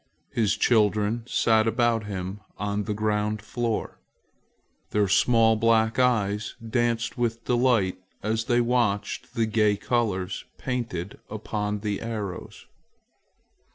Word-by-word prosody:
His 110 -4 +1
children 105 0 +2
sat 110 -2 +3
about 115 -1 +1
him 95 0 -5 0.2
on 105 +1 -2
the 105 - -1
ground 105 0 0
floor. 115 +1 -3 0.9
Their 105 -1 +2
small 115 +3 +4
black 110 +1 +2
eyes 105 -4 +1
danced 120 0 0
with 115 -1 -1
delight 120 -7 +2 0.2
as 110 +1 0
they 120 -1 +3
watched 120 -2 -1
the 115 -2 +2
gay 105 -2 +2
colors 100 -5 -1
painted 115 -8 -4
upon 105 -1 -3
the 105 -2 -2
arrows. 105 -5 -6
110 Hz, 115 wpm, -26 LUFS, 105-115 Hz, 0.9 s, small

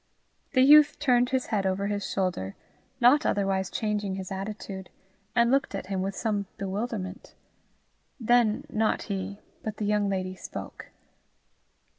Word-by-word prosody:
The 255 -1 +5
youth 295 +2 +7
turned 250 -4 +3
his 260 -1 0
head 195 -2 +1
over 190 +1 -1
his 205 -1 -2
shoulder, 180 - -2 0.4
not 265 +5 +6
otherwise 195 -2 0
changing 210 -3 -2
his 190 -1 -6
attitude, 195 -1 -6 0.5
and 235 0 +4
looked 275 +1 +1
at - - -4
him 190 - 0
with 195 +1 -2
some 205 -3 -1
bewilderment. 200 -1 -4 0.8
Then, 235 -2 +3
not 220 0 0
he, 200 0 -4 0.2
but 215 -1 -5
the 210 - -2
young 205 -1 +1
lady 185 -1 -2
spoke. - - -8
205 Hz, 140 wpm, -27 LUFS, 190-235 Hz, 0.8 s, youth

